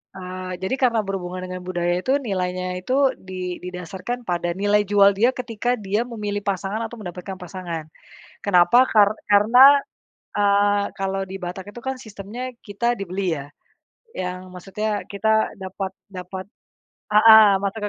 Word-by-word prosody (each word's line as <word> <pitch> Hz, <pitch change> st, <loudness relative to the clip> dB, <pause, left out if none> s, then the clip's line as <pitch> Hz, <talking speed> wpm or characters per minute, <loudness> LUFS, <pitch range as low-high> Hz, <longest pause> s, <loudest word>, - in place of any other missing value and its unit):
Eee, 185 Hz, -1 st, -6 dB
jadi 190 Hz, +7 st, -3 dB
karena 250 Hz, -4 st, +2 dB
berhubungan 185 Hz, -1 st, -4 dB
dengan 185 Hz, 0 st, -6 dB
budaya, 175 Hz, -1 st, -1 dB
itu 265 Hz, +6 st, +2 dB
nilainya 185 Hz, -7 st, -2 dB, 0.2 s
itu 265 Hz, +5 st, +2 dB
di 185 Hz, -1 st, -6 dB
didasarkan 180 Hz, +7 st, -6 dB
pada 175 Hz, -2 st, -1 dB
nilai 205 Hz, +1 st, +3 dB
jual 200 Hz, 0 st, +4 dB
dia 230 Hz, +6 st, +3 dB
ketika 245 Hz, -1 st, -2 dB
dia 205 Hz, +1 st, -1 dB
memilih 210 Hz, -4 st, -4 dB
pasangan 200 Hz, +2 st, -2 dB
atau 230 Hz, +1 st, -6 dB
mendapatkan 185 Hz, -1 st, -7 dB
pasangan. 175 Hz, -3 st, -6 dB, 0.6 s
Kenapa? 200 Hz, +7 st, +5 dB
Kar 205 Hz, -4 st, +5 dB, 0.2 s
karena, 250 Hz, +8 st, +7 dB, 0.6 s
eee, 205 Hz, 0 st, +3 dB
kalau 195 Hz, 0 st, -2 dB
di 190 Hz, 0 st, -8 dB
Batak 190 Hz, +3 st, -7 dB
itu, 240 Hz, -, -8 dB
kan, 265 Hz, -1 st, -3 dB
sistemnya 230 Hz, +3 st, -7 dB
kita 235 Hz, +4 st, -1 dB
dibeli, 190 Hz, -3 st, -2 dB
ya, 140 Hz, -1 st, -8 dB, 0.6 s
yang 185 Hz, 0 st, -5 dB
maksudnya 205 Hz, +2 st, -3 dB
kita 220 Hz, +2 st, +1 dB
dapat 190 Hz, 0 st, -5 dB, 0.2 s
dapat, 185 Hz, 0 st, -8 dB, 0.6 s
heeh, 220 Hz, 0 st, +8 dB
maka 200 Hz, +2 st, -3 dB
200 Hz, 140 wpm, -22 LUFS, 185-220 Hz, 0.6 s, heeh